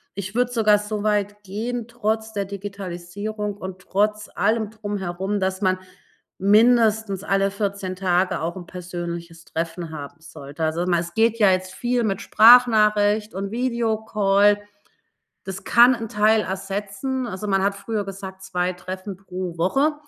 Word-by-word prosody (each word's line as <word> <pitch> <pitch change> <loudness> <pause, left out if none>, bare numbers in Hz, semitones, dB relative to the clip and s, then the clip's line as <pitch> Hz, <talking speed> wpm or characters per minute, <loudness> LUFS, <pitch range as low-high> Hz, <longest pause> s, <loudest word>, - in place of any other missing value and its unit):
ich 195 +1 -6
würde 245 0 +1
sogar 215 -3 +4
so 210 0 -4
weit 205 -1 0
gehen 225 +4 -4
trotz 220 -2 -2
der 200 -1 -1
Digitalisierung 200 +1 -5
und 190 -2 -7
trotz 210 +3 -1
allem 220 -1 +1
Drumherum, 205 -2 -3
dass 190 0 -1
man 185 -1 +2 0.6
mindestens 215 -1 +3
alle 195 0 +1
14 200 -2 -3
Tage 185 -1 +1
auch 165 +2 -3
'n 180 - -8
persönliches 170 -2 -7
Treffen 165 0 -4
haben 150 +1 -8
sollte. 145 -1 -8
Also, 165 +3 -1
mal 175 -2 +2
es 170 0 -8
geht 230 +2 +2
ja 205 -3 +6
jetzt 185 0 -1
viel 240 +4 0
mit 195 -3 -1
Sprachnachricht 215 -2 +5
und 195 +1 -4
Videocall. 220 -4 +2 0.8
Das 190 0 -7
kann 245 +2 +6
'n 225 -2 -5
Teil 215 +1 +3
ersetzen. 200 +7 -3
Also, 205 -1 -5
man 195 -1 +2
hat 200 0 +1
früher 205 +1 -3
gesagt, 190 -1 -8
2 180 -1 -1
Treffen 185 +2 -7
pro 185 -2 -6
Woche. 270 - +2
200 Hz, 150 wpm, -23 LUFS, 185-215 Hz, 0.8 s, ja